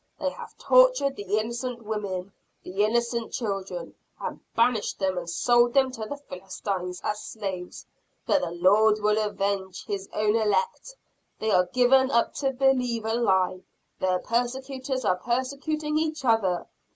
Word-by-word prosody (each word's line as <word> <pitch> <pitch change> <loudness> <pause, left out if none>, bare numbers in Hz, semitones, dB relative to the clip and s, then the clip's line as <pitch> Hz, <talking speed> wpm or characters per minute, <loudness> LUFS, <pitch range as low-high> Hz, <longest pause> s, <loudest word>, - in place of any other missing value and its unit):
They - - 0
have - - -11
tortured - - +4
the 205 -1 -1
innocent 235 +2 -3
women, 200 -3 -4 0.3
the 195 +3 -1
innocent 235 +1 0
children 195 -6 -4 0.3
and - - -5 0.2
banished 230 -2 +2
them 190 -1 0
and 175 -1 -4
sold 240 +7 +3
them 265 -1 +4
to 225 -3 -6
the 285 - -5
Philistines 185 -6 -5
as 210 0 -2
slaves. 190 -5 -6 0.4
But 290 - +3
the - - -2
Lord 205 +5 +4
will 210 +1 +2
avenge 195 -2 -2
His 195 -1 -4
own 210 0 +1
elect! 215 - 0 0.4
They 220 - -1
are 180 -2 +4
given 255 +4 +4
up 235 -3 +2
to 275 -2 +1
believe 250 -4 +1
a 220 - 0
lie! 190 -5 +2 0.4
The 185 -1 +1
persecutors 260 +2 -2
are 180 - +2
persecuting 280 - -1
each 315 -3 -2
other! 200 -7 +2
220 Hz, 150 wpm, -26 LUFS, 195-255 Hz, 0.4 s, tortured